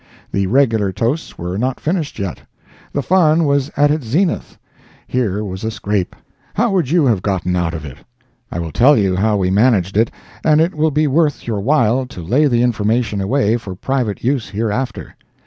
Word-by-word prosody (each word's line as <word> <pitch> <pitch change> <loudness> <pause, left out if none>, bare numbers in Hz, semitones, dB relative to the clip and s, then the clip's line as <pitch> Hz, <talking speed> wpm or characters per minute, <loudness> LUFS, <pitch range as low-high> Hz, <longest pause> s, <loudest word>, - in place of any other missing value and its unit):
The 100 -1 0
regular 115 -4 +2
toasts 120 - -2
were 90 +3 -4
not 130 +2 -1
finished 160 -2 -2
yet. 100 -5 -4 0.5
The 145 - -2
fun 165 -3 +3
was 140 -1 +1
at 145 +1 +4
its 150 -6 -2
zenith. 170 - -1 0.5
Here 105 -5 -1
was 95 0 -6
a 110 - -1
scrape. 105 -3 -2 0.4
How 230 0 +2
would 180 -9 +1
you 165 -1 +3
have 110 -8 +2
gotten 90 -2 -1
out 85 -2 -1
of 80 - -6
it? 70 -3 -10 0.5
I - - -4
will 85 -2 -4
tell 135 - +5 0.2
how 105 +2 +1
we 95 -1 0
managed 100 -3 +2
it, 110 +2 +3 0.3
and 155 -1 +4
it 165 +3 +2
will 155 +1 +1
be 150 +1 +1
worth 150 +1 +1
your 110 -3 -2
while 125 +1 +2
to 90 -8 -9
lay 130 - +3
the 120 -3 +2
information 110 -2 0
away 110 +2 +1
for 100 -5 -8
private 125 0 -2
use 130 -3 0
hereafter. 110 +5 -3
120 Hz, 185 wpm, -18 LUFS, 100-145 Hz, 0.5 s, tell